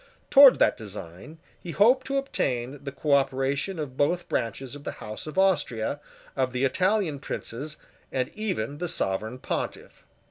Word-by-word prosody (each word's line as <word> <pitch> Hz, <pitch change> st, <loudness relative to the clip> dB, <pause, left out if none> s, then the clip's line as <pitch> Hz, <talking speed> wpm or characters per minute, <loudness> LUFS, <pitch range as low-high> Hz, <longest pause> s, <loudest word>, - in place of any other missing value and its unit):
Towards 275 Hz, -2 st, +9 dB
that -, -, +3 dB
design 100 Hz, -, -9 dB, 0.2 s
he 175 Hz, -, -9 dB
hoped 245 Hz, -, +4 dB
to 275 Hz, +1 st, 0 dB
obtain 135 Hz, -, -2 dB
the 140 Hz, -, -5 dB
cooperation 140 Hz, +4 st, 0 dB
of 140 Hz, -4 st, -5 dB
both 175 Hz, +5 st, +1 dB
branches 125 Hz, +2 st, -2 dB
of 145 Hz, 0 st, -9 dB
the -, -, -4 dB
House 110 Hz, +7 st, -8 dB
of 155 Hz, -, -7 dB
Austria, 145 Hz, -, +1 dB, 0.4 s
of 130 Hz, -2 st, 0 dB
the 125 Hz, +1 st, -1 dB
Italian 185 Hz, +1 st, +1 dB
princes, 145 Hz, +3 st, -4 dB, 0.3 s
and 130 Hz, -1 st, -1 dB
even 195 Hz, -, -2 dB
of 145 Hz, -, -10 dB
the 175 Hz, -, -2 dB
Sovereign 110 Hz, -, 0 dB
Pontiff. -, -, -5 dB
140 Hz, 155 wpm, -26 LUFS, 125-180 Hz, 0.4 s, Towards